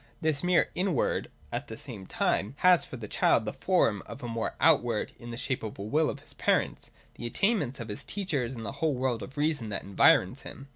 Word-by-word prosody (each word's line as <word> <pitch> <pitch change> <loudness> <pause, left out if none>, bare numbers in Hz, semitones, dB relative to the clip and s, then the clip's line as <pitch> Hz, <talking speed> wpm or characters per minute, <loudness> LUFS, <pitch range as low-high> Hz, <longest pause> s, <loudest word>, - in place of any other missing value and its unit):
This 155 -4 0
mere 180 -1 +3
inward, 180 -6 0 0.2
at - - -3
the - - -7
same 95 -1 -7
time, 105 +7 0
has 180 -4 +7
for 130 - -8
the 110 -3 -7
child 110 - +3
the 105 - -3
form 115 - +2
of 140 - -9
a - - -3
mere 115 -1 -2
outward, 120 -9 +3
in 120 - -9
the 115 - -6
shape 130 0 -1
of 110 -2 -5
the 100 - -6
will 150 +9 +2
of - - -6
his - - -9
parents, - - 0 0.3
the 120 - -2
attainments 150 - 0
of 115 -2 -6
his 105 - -4
teachers, 145 - -2
and 115 -2 -6
the 100 - -3
whole 155 -4 +2
world 125 -2 -1
of 135 - -9
reason 145 -7 0
that 100 - -3
environs 100 0 +4
him. 135 +1 -9
130 Hz, 225 wpm, -29 LUFS, 115-155 Hz, 0.3 s, has